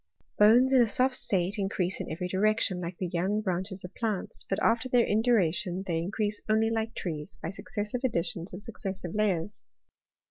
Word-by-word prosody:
Bones 240 +6 +6
in 260 - +7
a 235 - +4
soft 255 +5 +2
state 195 -3 -1
increase 190 -2 -1
in - - -6
every 170 +3 -3
direction, 190 -1 +1
like 170 0 -5
the 185 - -2
young 180 +4 0
branches 190 -1 -3
of 180 - -8
plants; 215 -5 -3
but 195 - 0
after 230 +3 +2
their 245 -2 +4
induration 195 -5 +1
they 165 -3 0
in 170 +3 -3
crease 210 0 -2
only 220 +1 +3
like 225 0 -2
trees, 155 -4 -5
by 165 - -2
successive 210 +3 -4
additions 170 -6 -1
of 185 +3 -6
suc 230 - -10
cessive 190 -3 -4
layers. 205 -2 -1
200 Hz, 185 wpm, -29 LUFS, 180-220 Hz, -, in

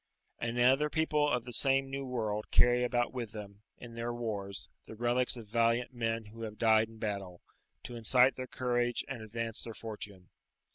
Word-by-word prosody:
And 115 +1 -2
other 135 +5 +5
people 150 -2 +2
of 125 -3 0
the 120 - -6
same 135 +1 +2
New 135 0 -3
World 110 -4 -2
carry 120 0 +5
about 120 0 +1
with 120 -4 -4
them, 100 -1 -9 0.2
in 120 -1 -10
their 115 +1 -3
wars, 105 -5 -4 0.2
the 110 - -9
relics 120 +2 +2
of 115 - -8
valiant 115 +3 +1
men 115 -2 -1
who 110 +2 -11
have 110 -1 -5
died 110 -1 +4
in 115 0 -14
battle, 100 -5 -4 0.4
to 120 - -7
incite 125 +3 +5
their 130 0 -6
courage 120 -1 0
and 130 -4 -5
advance 115 +1 -4
their 115 -2 -7
fortune. 105 -4 -7
115 Hz, 185 wpm, -32 LUFS, 110-125 Hz, 0.4 s, other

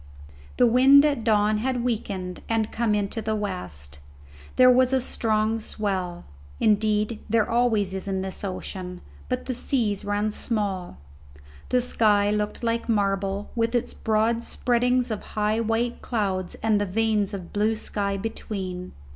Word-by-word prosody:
The 245 - +5
wind 265 +4 +7
at 280 -6 0
dawn 215 -1 +3
had 250 +1 -1
weakened 200 -6 -3
and 225 -1 0
come 225 -2 +1
into 205 +2 -1
the 220 0 -1
west. 85 - -5 0.6
There 255 - +7
was 255 +1 +4
a 265 - +4
strong 220 -3 0
swell 190 - -3 0.3
indeed 215 +1 +2
there 225 -1 +2
always 225 -5 +1
is 190 +1 -5
in 190 -1 -1
this 190 +1 -2
ocean 185 -1 -5 0.3
but - - -2
the 255 - -2
seas 230 -5 0
ran 205 +1 0
small. 200 -5 -3 0.7
The 250 - +3
sky 210 -4 +2
looked 210 +2 -2
like 230 0 -1
marble, 200 -1 0
with 230 +1 0
its 240 - -1
broad 225 +2 +1
spreadings 245 0 +1
of 215 - -3 0.2
high 215 +1 +1
white 230 +1 -1
clouds 190 -5 -2
and 215 -2 +3
the 205 - -1
veins 210 0 +1
of 180 -3 -9
blue 215 +2 +1
sky 200 -2 -2
between. 190 -3 -5
215 Hz, 150 wpm, -25 LUFS, 200-230 Hz, 0.7 s, wind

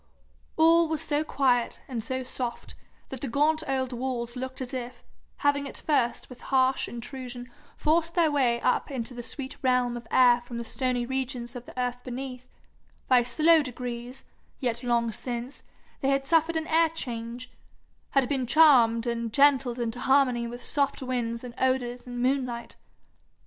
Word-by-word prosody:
All 330 +1 +5
was 315 -1 -1
so 295 0 0
quiet 255 -5 +1
and 235 -4 -4
so 260 +3 -3
soft 250 -1 -5 0.4
that 265 -3 -5
the 275 - -3
gaunt 300 +5 +2
old 260 -1 -1
walls 240 -1 -3
looked 260 +1 -5
as 260 0 -5
if, 250 -1 -6 0.3
having 285 0 +1
at - - -7
first 250 -6 0
with 250 - -13
harsh 260 0 +1
intrusion 245 0 -7 0.3
forced 330 +2 +1
their 330 -3 +4
way 250 -5 +2
up 250 - +1
into 255 -3 -3
the 240 - -6
sweet 260 +2 -4
realm 250 -2 +2
of 240 -1 -8
air 245 -1 +5
from 240 -1 -8
the 235 - -4
stony 250 -1 -1
regions 255 -1 -3
of 245 0 -8
the - - -8
earth 245 0 -2
beneath, 255 0 -6 0.6
by 255 -1 +5
slow 310 +7 +4
degrees, 250 -1 -6 0.3
yet 240 -2 -2
long 235 -1 +1
since, 245 +3 -5 0.4
they 270 - 0
had 275 0 +1
suffered 325 +2 +2
an 320 - -2
air 325 +1 +3
change, 240 -5 -6 0.6
and 270 -2 +4
been 265 -3 -1
charmed 240 -6 +5
and 235 -1 -2
gentled 270 -2 +4
into 235 0 -3
harmony 255 -3 +3
with 240 +1 -8
soft 280 -2 0
winds 240 -2 -2
and 245 -1 -7
odours 250 -1 0
and 245 0 -4
moonlight. 250 -3 -1
255 Hz, 165 wpm, -27 LUFS, 240-275 Hz, 0.6 s, All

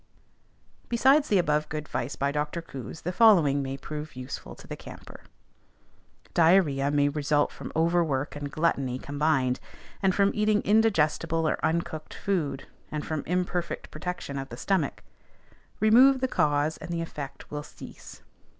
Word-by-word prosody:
Besides 270 +5 +4
the 205 - +4
above 150 -3 +1
good 155 -1 -3
advice 135 -3 -4
by 140 +1 0
Dr. 150 +3 -2
Coues, 140 -4 -8
the 180 - -2
following 175 -10 +5
may 135 0 -4
prove 150 +1 -7
useful 130 +1 -7
to - - -14
the - - -6
camper: - - -12 1.1
Diarrhoea 160 -5 +4
may 145 0 +3
result 145 0 +1
from - - -8
overwork 160 -4 +1
and 145 -1 -5
gluttony 140 -6 0
combined, 140 -2 0 0.4
and 190 -1 +2
from 200 0 +3
eating 210 0 +2
indigestible 165 -6 +2
or - - -1
uncooked 160 -1 -2
food, 155 -9 -2 0.2
and 150 -1 -4
from 155 -2 -2
imperfect 180 0 -2
protection 155 -3 -5
of 135 - -6
the 120 - -8
stomach. 185 -1 -1 0.8
"Remove 255 +6 +6
the 260 - +1
cause, 150 - +1
and 160 - -9
the 170 -1 -2
effect 145 -4 -8
will 150 0 -3
cease." - - -12
155 Hz, 150 wpm, -27 LUFS, 145-180 Hz, 1.1 s, Remove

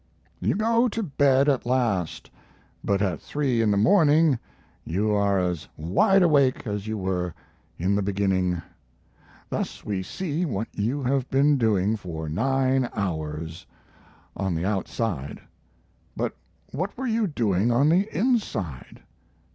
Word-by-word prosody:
You - - 0
go 230 +3 +3
to 225 +1 -3
bed 140 -4 +3
at 140 -3 +2
last; 115 -10 -1 0.5
but 100 0 +1
at 90 -5 -1
three 135 -6 0
in 110 - +2
the 100 - +2
morning 150 - +4 0.4
you 100 +6 0
are 100 -1 +2
as 90 -3 -1
wide 185 - +3
awake 140 -7 +3
as 105 -1 -4
you 110 0 -2
were 90 -3 -2 0.4
in 90 +4 0
the 100 - +1
beginning. 95 -3 0 0.9
Thus - - -4
we 100 -3 -2
see 160 - -3
what 115 - -2
you 125 +7 -1
have 130 0 0
been 145 +2 +4
doing 105 -2 +2
for 80 -5 -6
nine 130 - +1
hours 80 -4 -4 0.7
on 95 -3 -1
the 80 +2 -2
outside. 95 - -2 0.8
But - - -2 0.4
what 185 - -4
were 265 - -3
you 225 -3 +1
doing 115 - +1
on 135 +6 +4
the 190 +6 +3
inside? 180 - -2
110 Hz, 140 wpm, -25 LUFS, 95-145 Hz, 0.9 s, morning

